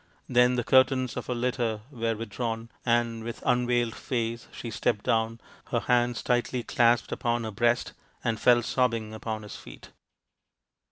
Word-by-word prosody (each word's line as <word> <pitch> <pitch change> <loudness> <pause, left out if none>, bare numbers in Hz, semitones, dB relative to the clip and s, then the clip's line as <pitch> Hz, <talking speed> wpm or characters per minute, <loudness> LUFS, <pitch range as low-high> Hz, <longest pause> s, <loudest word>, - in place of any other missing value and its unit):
Then 125 0 +4
the 120 - 0
curtains 130 -1 +3
of - - -5
her 125 - -1
litter 120 -3 -1
were 115 -3 -1
with 115 0 -6
drawn, 115 0 -3
and 115 -1 +1
with 115 0 -6
unveiled 120 -2 +2
face 115 -2 -3
she 115 - -7
stepped 105 0 -1
down, 115 0 +1 0.3
her - - -1
hands 120 -1 +1
tightly 120 0 0
clasped 120 0 +2
upon 120 0 -1
her 110 - -4
breast, 120 +3 +1 0.3
and 110 -2 0
fell 120 -1 +5
sobbing 115 -3 0
upon 110 -1 -4
his 105 - -8
feet. - - -13
120 Hz, 160 wpm, -27 LUFS, 115-125 Hz, 0.3 s, fell